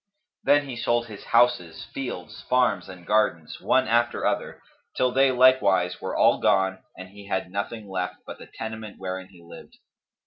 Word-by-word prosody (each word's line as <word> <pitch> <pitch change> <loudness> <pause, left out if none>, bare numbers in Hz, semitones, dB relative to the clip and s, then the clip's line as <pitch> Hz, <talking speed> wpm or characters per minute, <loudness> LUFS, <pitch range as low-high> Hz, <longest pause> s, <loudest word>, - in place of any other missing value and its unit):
Then 145 0 +3
he 130 - -6
sold 120 0 0
his 110 -3 -11
houses, 115 -9 +2
fields, 135 -2 -6
farms 125 -4 +2
and 90 -2 -11
gardens, 85 -7 0
one 130 0 +2
after 120 +1 +1
other, - - -2 0.4
till 125 -1 +2
they 135 +1 +4
likewise 125 -8 +3
were - - -4
all - - +4
gone 95 -3 +2 0.2
and 95 0 -9
he 100 +1 -13
had 95 -2 -2
nothing 105 +2 -4
left 90 -1 -3
but - - -9
the - - -11
tenement 110 -1 -7
wherein 95 0 -5
he 90 -3 -18
lived. 85 - -14
105 Hz, 170 wpm, -25 LUFS, 95-125 Hz, 0.4 s, they